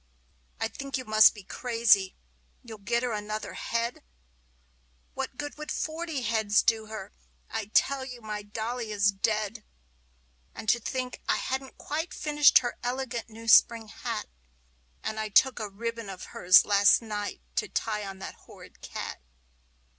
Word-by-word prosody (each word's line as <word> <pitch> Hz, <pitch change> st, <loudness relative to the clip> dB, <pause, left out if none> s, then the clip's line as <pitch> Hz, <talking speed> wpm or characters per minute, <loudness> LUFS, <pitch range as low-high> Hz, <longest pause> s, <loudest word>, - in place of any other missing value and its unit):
I -, -, 0 dB
think 275 Hz, 0 st, -5 dB
you 255 Hz, -, -6 dB
must 215 Hz, +1 st, +6 dB
be 205 Hz, -, -11 dB
crazy 230 Hz, -4 st, +2 dB, 0.5 s
you'll 225 Hz, -3 st, -10 dB
get 235 Hz, +4 st, 0 dB
her 250 Hz, -, -1 dB
another 215 Hz, 0 st, -4 dB
head! 235 Hz, +1 st, -2 dB, 1.1 s
What 250 Hz, -, -5 dB
good 290 Hz, 0 st, -6 dB
would 300 Hz, -, -5 dB
forty 315 Hz, -3 st, -3 dB
heads 215 Hz, -2 st, +2 dB
do 220 Hz, -2 st, +1 dB
her? 215 Hz, -2 st, -8 dB, 0.4 s
I 220 Hz, -2 st, -2 dB
tell 265 Hz, +6 st, +2 dB
you 250 Hz, -2 st, -8 dB
my 210 Hz, -2 st, -5 dB
dolly 220 Hz, +2 st, -4 dB
is 200 Hz, -1 st, +3 dB
dead! 210 Hz, +2 st, -1 dB, 0.9 s
And -, -, -8 dB
to 240 Hz, -, +4 dB
think 255 Hz, +2 st, -4 dB
I -, -, +4 dB
hadn't 265 Hz, 0 st, -4 dB
quite 320 Hz, +4 st, -4 dB
finished 295 Hz, -1 st, +5 dB
her 240 Hz, -, -4 dB
elegant 245 Hz, -2 st, -3 dB
new 225 Hz, +1 st, -11 dB
spring 230 Hz, 0 st, +6 dB
hat! -, -, -4 dB, 0.8 s
And 220 Hz, 0 st, -3 dB
I 215 Hz, 0 st, -2 dB
took 260 Hz, +5 st, +4 dB
a 215 Hz, -, -2 dB
sweet 195 Hz, -, -18 dB
ribbon 230 Hz, -1 st, -4 dB
of 185 Hz, -1 st, -8 dB
hers 185 Hz, +1 st, +6 dB
last 205 Hz, +2 st, +5 dB
night 210 Hz, -2 st, -4 dB, 0.2 s
to -, -, +1 dB
tie 210 Hz, -2 st, -2 dB
on 195 Hz, -1 st, -7 dB
that 190 Hz, -, -7 dB
horrid -, -, -16 dB
cat! -, -, -6 dB
225 Hz, 160 wpm, -28 LUFS, 210-250 Hz, 1.1 s, must